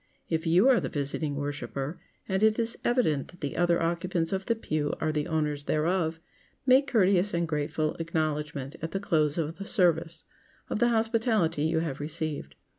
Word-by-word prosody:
If 160 +1 0
you 180 +9 +5
are 260 -3 +6
the - - -3
visiting 145 +1 -2
worshiper, 145 +1 -4 0.3
and 190 0 0
it 220 0 +4
is 230 0 -1
evident 195 - +1
that 175 - -16
the 145 - -3
other 175 0 +3
occupants 170 +1 -1
of 190 0 -3
the 230 - +2
pew 155 -9 -2
are 155 - 0
the 150 -1 -1
owners 150 -2 -1
thereof, 160 +1 0 0.5
make 265 +2 +5
courteous 200 -5 +3
and 170 0 0
grateful 155 0 -1
acknowledgment 155 -3 -2
at 160 +1 -4
the 195 - 0
close 155 -7 +1
of 165 +1 -2
the 195 - -5
service, 170 -5 +1 0.5
of - - 0
the 240 +1 +4
hospitality 220 - +1
you 160 0 +1
have 150 -5 -3
received. 150 - -4
165 Hz, 180 wpm, -28 LUFS, 150-195 Hz, 0.5 s, are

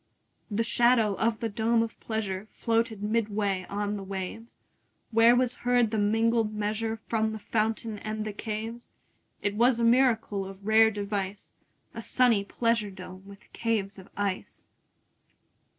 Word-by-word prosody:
30 205 - -4
The 230 - +2
shadow 235 -2 +3
of 220 +2 0
the 230 - 0
dome 225 +2 +1
of 225 - -7
pleasure 215 -3 -3
Floated 225 -2 0
midway 205 -3 0
on 205 +1 -2
the 195 - -6
waves; 195 +4 -6 0.6
Where 230 +2 +6
was 250 0 +2
heard 245 -2 +3
the 220 - 0
mingled 225 +1 +2
measure 220 +2 -2
From 220 -1 0
the - - -4
fountain 220 0 -2
and 215 0 -4
the 215 - -4
caves. 225 +3 -5 0.5
It 205 - 0
was 235 +3 +3
a - - +1
miracle 230 -4 +3
of 195 +1 -10
rare 220 +1 +6
device, 200 -1 -4 0.4
35 - - -7
A - - -7
sunny 240 -6 +3
pleasure 230 0 0
dome 185 -1 -10
with 200 0 -15
caves 210 -4 -1
of 190 - -14
ice! 200 -2 -4
220 Hz, 155 wpm, -28 LUFS, 205-230 Hz, 0.6 s, Where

